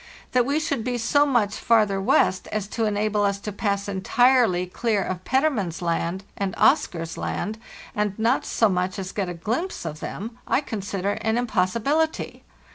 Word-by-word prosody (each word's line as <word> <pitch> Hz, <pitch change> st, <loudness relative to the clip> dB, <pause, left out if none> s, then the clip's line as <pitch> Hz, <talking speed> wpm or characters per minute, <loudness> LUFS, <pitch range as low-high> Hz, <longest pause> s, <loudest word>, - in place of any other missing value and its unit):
* -, -, -23 dB
That 250 Hz, -1 st, +3 dB
we 285 Hz, +2 st, +1 dB
should 285 Hz, -6 st, -1 dB
be 245 Hz, 0 st, -1 dB
so 285 Hz, +5 st, +3 dB
much 230 Hz, -7 st, +1 dB
farther 210 Hz, -4 st, +2 dB
west 190 Hz, -1 st, +2 dB
as 215 Hz, -2 st, -2 dB
to 225 Hz, 0 st, -1 dB
enable 210 Hz, 0 st, +1 dB
us 200 Hz, -1 st, +1 dB
to 210 Hz, -, -4 dB
pass 200 Hz, -1 st, -1 dB
entirely 200 Hz, 0 st, +3 dB
clear 210 Hz, +2 st, 0 dB
of 185 Hz, 0 st, -4 dB
Petermann's 260 Hz, -, +1 dB
Land 170 Hz, +2 st, -1 dB
and 195 Hz, -2 st, -2 dB
Oscar's 165 Hz, -1 st, +2 dB
Land, 220 Hz, +2 st, -3 dB, 0.3 s
and 210 Hz, -1 st, -1 dB
not 230 Hz, +4 st, +2 dB
so 225 Hz, -, +2 dB
much 185 Hz, -1 st, -1 dB
as 190 Hz, -1 st, -4 dB
get 195 Hz, -3 st, -2 dB
a 175 Hz, -, -5 dB
glimpse 235 Hz, -, -3 dB
of 155 Hz, -1 st, -5 dB
them, 225 Hz, +4 st, -6 dB
I -, -, +2 dB
consider 200 Hz, -5 st, -3 dB
an 220 Hz, 0 st, +1 dB
impossi 225 Hz, -3 st, 0 dB
bility. 315 Hz, +4 st, 0 dB
210 Hz, 180 wpm, -24 LUFS, 190-240 Hz, 0.3 s, That